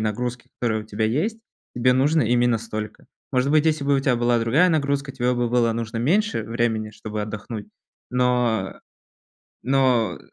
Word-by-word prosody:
нагрузки, 120 Hz, +3 st, -3 dB
которая 110 Hz, -3 st, 0 dB
у -, -, -15 dB
тебя 110 Hz, +1 st, -2 dB
есть, 155 Hz, -, 0 dB, 0.4 s
тебе 125 Hz, +1 st, +3 dB
нужно 145 Hz, +5 st, +3 dB
именно 120 Hz, +1 st, +2 dB
столько. 110 Hz, -1 st, -6 dB, 0.3 s
Может 130 Hz, +2 st, +1 dB
быть, 155 Hz, +1 st, +3 dB
если 155 Hz, -3 st, +1 dB
бы 140 Hz, 0 st, +2 dB
у -, -, +1 dB
тя 135 Hz, -2 st, +1 dB
была 120 Hz, 0 st, +2 dB
другая 130 Hz, +11 st, +3 dB
нагрузка, 140 Hz, -3 st, 0 dB
тебе 125 Hz, -1 st, 0 dB
бы 120 Hz, -1 st, -1 dB
было 120 Hz, -1 st, +3 dB
нужно 115 Hz, 0 st, -4 dB
меньше 170 Hz, -, +1 dB
времени, 115 Hz, -1 st, -1 dB
чтобы 110 Hz, 0 st, -6 dB
отдохнуть. 105 Hz, 0 st, -6 dB, 0.4 s
Но 125 Hz, -5 st, 0 dB, 0.8 s
но 130 Hz, -3 st, +2 dB
120 Hz, 165 wpm, -23 LUFS, 110-135 Hz, 0.8 s, тебе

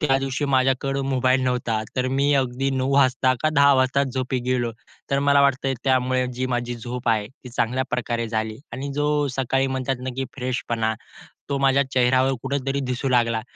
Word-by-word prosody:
त्यादिवशी 135 Hz, -1 st, 0 dB
माझ्याकडं 135 Hz, 0 st, +1 dB
मोबाईल 130 Hz, 0 st, +2 dB
नव्हता 125 Hz, -3 st, 0 dB, 0.2 s
तर 130 Hz, 0 st, +1 dB
मी 140 Hz, +1 st, +2 dB
अगदी 130 Hz, +2 st, -2 dB
9 130 Hz, 0 st, -1 dB
वाजता 130 Hz, -1 st, +3 dB
का 155 Hz, -, +3 dB
10 140 Hz, 0 st, +6 dB
वाजता 130 Hz, +1 st, +2 dB
झोपी 130 Hz, 0 st, -2 dB
गेलो. 120 Hz, -2 st, 0 dB, 0.4 s
तर 140 Hz, -, +2 dB
मला 140 Hz, 0 st, +5 dB
वाटतं 135 Hz, -1 st, +2 dB
त्यामुळे 130 Hz, -1 st, +2 dB
जी 130 Hz, +1 st, -2 dB
माझी 120 Hz, -1 st, -2 dB
झोप 120 Hz, +1 st, -5 dB
आहे 110 Hz, -2 st, +2 dB
ती 130 Hz, -1 st, -14 dB
चांगल्या 125 Hz, +2 st, -1 dB
प्रकारे 120 Hz, -2 st, -2 dB
झाली 110 Hz, 0 st, -3 dB
आणि 140 Hz, +2 st, -5 dB
जो 145 Hz, +1 st, 0 dB, 0.3 s
सकाळी 135 Hz, +1 st, +1 dB
म्हणतात 130 Hz, 0 st, -2 dB
ना, 130 Hz, -, -4 dB
की 135 Hz, -, -1 dB
फ्रेशपणा 120 Hz, -3 st, -1 dB, 0.6 s
तो 140 Hz, -, 0 dB
माझ्या 135 Hz, 0 st, +3 dB
चेहऱ्यावर 130 Hz, +1 st, +3 dB
कुठेतरी 135 Hz, +1 st, -2 dB
दिसू 125 Hz, +2 st, -2 dB
लागला, 115 Hz, -3 st, +2 dB
130 Hz, 175 wpm, -23 LUFS, 125-135 Hz, 0.6 s, 10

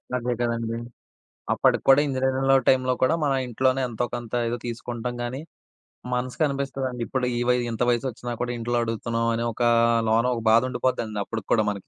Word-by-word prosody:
అదే 125 Hz, 0 st, -1 dB
కదండీ! 115 Hz, -1 st, -1 dB, 0.8 s
అప్పటికి -, -, +2 dB
కూడా 135 Hz, +1 st, +8 dB
ఇంజినీరింగ్‌లో 135 Hz, 0 st, +2 dB
టైమ్‌లో 130 Hz, -1 st, +3 dB
కూడా 130 Hz, +5 st, +4 dB
మన 140 Hz, -, +2 dB
ఇంట్లోనే 130 Hz, +2 st, +1 dB
ఎంతోకొంత 120 Hz, 0 st, -4 dB, 0.2 s
ఏదో 120 Hz, +1 st, -2 dB
తీసుకుంటాం 120 Hz, +1 st, -4 dB
గానీ, 125 Hz, +3 st, -4 dB, 0.7 s
మనసుకి 125 Hz, +4 st, -1 dB
అనిపిస్తదండి. 135 Hz, -3 st, -3 dB
ఇప్పుడు 130 Hz, -2 st, -1 dB
ఈ -, -, 0 dB
వయ్ 125 Hz, 0 st, +3 dB
ఇంత 115 Hz, +1 st, -1 dB
వయసొచ్చినా 120 Hz, 0 st, -2 dB
కూడా 120 Hz, 0 st, -1 dB
ఇంట్లో 120 Hz, +1 st, -1 dB
అడుగుతున్నాం 115 Hz, 0 st, -2 dB
అనే 115 Hz, +1 st, -1 dB
ఒక 120 Hz, -, -2 dB, 0.5 s
లోన 115 Hz, +2 st, +3 dB
ఒక 115 Hz, -, -4 dB
బాధ 115 Hz, +1 st, +6 dB
ఉండిపోదండి 115 Hz, -4 st, -1 dB
అప్పటికి 110 Hz, -3 st, -6 dB
కూడా 110 Hz, -2 st, +3 dB
మనకి 100 Hz, -2 st, -5 dB
120 Hz, 160 wpm, -25 LUFS, 115-130 Hz, 0.8 s, కూడా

